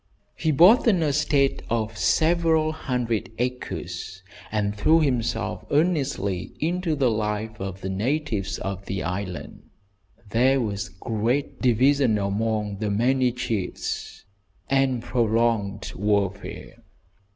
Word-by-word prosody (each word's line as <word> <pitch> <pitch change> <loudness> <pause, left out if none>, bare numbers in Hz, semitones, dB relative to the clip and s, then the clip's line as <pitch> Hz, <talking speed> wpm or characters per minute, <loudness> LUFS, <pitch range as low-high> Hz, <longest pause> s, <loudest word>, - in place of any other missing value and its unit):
He 160 - -1
bought 180 - +6
an 185 -7 +4
estate 145 -2 +2
of 110 -1 -1
several 160 +4 +2
hundred 125 -7 -2
acres, 120 -6 -4 0.3
and 105 -1 0
threw 155 +11 +4
himself 130 -7 -1
earnestly 140 - 0
into 170 0 0
the 135 -4 +2
life 110 0 -2
of 95 0 -5
the 95 - -4
natives 110 -1 -1
of 100 0 -5
the 95 0 -3
island. 90 0 -5 0.7
There 130 +4 +3
was 100 -5 -3
great 115 +8 -2
division 130 -1 +3
among 105 0 -1
the 105 -1 -1
many 125 +4 +2
chiefs, 115 -6 -4 0.5
and 135 -3 +2
prolonged 115 -4 0
warfare. 100 -1 -2
115 Hz, 110 wpm, -24 LUFS, 100-140 Hz, 0.7 s, bought